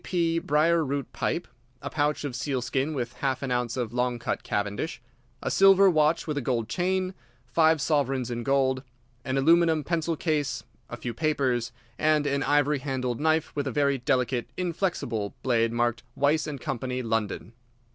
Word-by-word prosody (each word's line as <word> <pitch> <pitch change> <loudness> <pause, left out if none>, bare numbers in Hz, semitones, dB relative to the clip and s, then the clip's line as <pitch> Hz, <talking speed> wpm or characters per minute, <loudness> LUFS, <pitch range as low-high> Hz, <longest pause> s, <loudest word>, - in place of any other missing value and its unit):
D.P. 165 -2 +1
briar 165 -1 +2
root 140 -1 -3
pipe, 175 - -2 0.3
a 140 - -7
pouch 145 -1 0
of 140 -4 -4
seal 135 0 -1
skin 135 +5 -1
with 120 -3 -3
half 135 -1 -1
an 135 - -2
ounce 125 -1 -1
of 120 -3 -2
long 125 0 0
cut 115 - -3
Cavendish, 105 0 -2 0.4
a - - -1
silver 195 0 +6
watch 155 0 +2
with 150 -2 -2
a - - -4
gold 120 -3 -1
chain, 185 - 0 0.3
five 160 +3 +3
sovereigns 135 -4 0
in 120 0 -3
gold, 130 0 +1 0.4
an 130 +1 -1
aluminium 165 +2 +4
pencil 165 +1 -1
case, 150 -4 -1 0.3
a - - -6
few 120 - -4
papers, 130 -4 0 0.3
and 155 -1 +3
an 140 -1 0
ivory 145 0 +2
handled 130 -3 -2
knife 160 +1 +1
with 145 -1 -1
a - - -1
very 140 +1 +1
delicate, 125 0 0
inflexible 170 - -2
blade 115 -3 +2
marked 120 -1 0
Weiss 150 +2 +2
& - - -15
Co., 120 - -3
London. 115 -5 -2
140 Hz, 170 wpm, -27 LUFS, 125-155 Hz, 0.4 s, silver